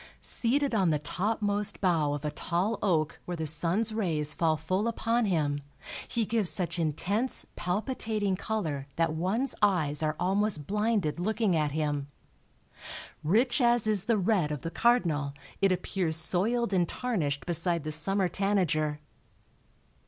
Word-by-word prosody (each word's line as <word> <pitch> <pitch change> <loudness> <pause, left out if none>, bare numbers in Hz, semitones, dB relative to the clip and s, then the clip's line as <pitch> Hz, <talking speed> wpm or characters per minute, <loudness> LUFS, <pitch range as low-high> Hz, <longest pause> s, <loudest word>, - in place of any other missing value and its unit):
Seated 270 +3 +1
on 190 -5 +3
the 155 - +2
topmost 205 +5 -1
bough 165 -6 +2
of 145 +1 -5
a 150 - -1
tall 185 +8 -1
oak, 160 -6 0
where 175 -1 -4
the 160 - -3
sun's 170 +8 0
rays 160 -8 0
fall 160 -2 +1
full 185 +8 -1
upon 230 0 0
him, 150 -7 0 0.5
he 230 -2 -1
gives 215 -4 +1
such 180 -1 +1
intense, 195 - 0
palpitating 210 +1 -1
color 160 -10 -3
that 165 -1 +1
one's 195 +12 -1
eyes 160 -8 +2
are 155 -1 0
almost 195 -4 0
blinded 210 -5 0
looking 215 0 +1
at 150 -2 0
him. 145 -2 -1 1.2
Rich 240 - +2
as 240 -2 +3
is 210 -4 +1
the 230 -1 +2
red 190 -5 +1
of 150 -4 -4
the 165 - -4
cardinal 165 - +1 0.3
it 195 -1 +4
appears 180 -2 +1
soiled 200 +7 +3
and 175 -3 +2
tarnished 160 - -2
beside 170 -1 -1
the 155 - -4
summer 190 +5 0
tanager. 165 -6 0
185 Hz, 145 wpm, -29 LUFS, 155-215 Hz, 1.2 s, it